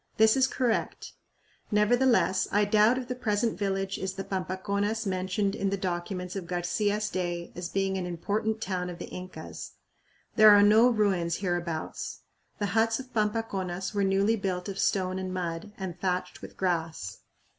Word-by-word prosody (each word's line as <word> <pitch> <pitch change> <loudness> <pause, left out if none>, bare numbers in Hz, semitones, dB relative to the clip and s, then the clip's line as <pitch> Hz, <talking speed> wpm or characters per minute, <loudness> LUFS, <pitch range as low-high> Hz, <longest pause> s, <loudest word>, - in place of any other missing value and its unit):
This 220 -1 +6
is 265 -1 +4
correct. 250 -4 -1 0.6
Nevertheless, 215 -2 +3
I 205 +1 +3
doubt 215 +4 +4
if 255 -1 -4
the 250 - -2
present 225 -2 0
village 195 -1 -2
is 190 -1 -3
the 195 - -4
Pampaconas 200 +4 -2
mentioned 190 +1 -1
in 195 -1 -1
the 200 - -1
documents 180 0 -3
of 185 -3 -5
Garcia's 205 +4 0
day 175 -3 -3
as 175 -1 -5
being 195 0 0
"an 180 - -3
important 210 +6 -2
town 180 -3 -2
of 175 - -7
the - - -6
Incas." 180 0 -8 0.6
There 215 -1 +9
are 205 -1 +8
no 220 +4 +6
ruins 195 -7 +1
hereabouts. 175 -4 -3 0.4
The 205 -3 -2
huts 225 0 +3
of 260 -1 -10
Pampaconas 210 -4 -1
were 200 -1 +1
newly 195 +3 +3
built 185 -3 -3
of 195 -1 -5
stone 185 -1 +1
and 185 -1 -4
mud, 175 +1 -4
and 180 -3 -6
thatched 185 -1 -2
with - - -10
grass. 165 - -2
195 Hz, 165 wpm, -28 LUFS, 180-215 Hz, 0.6 s, There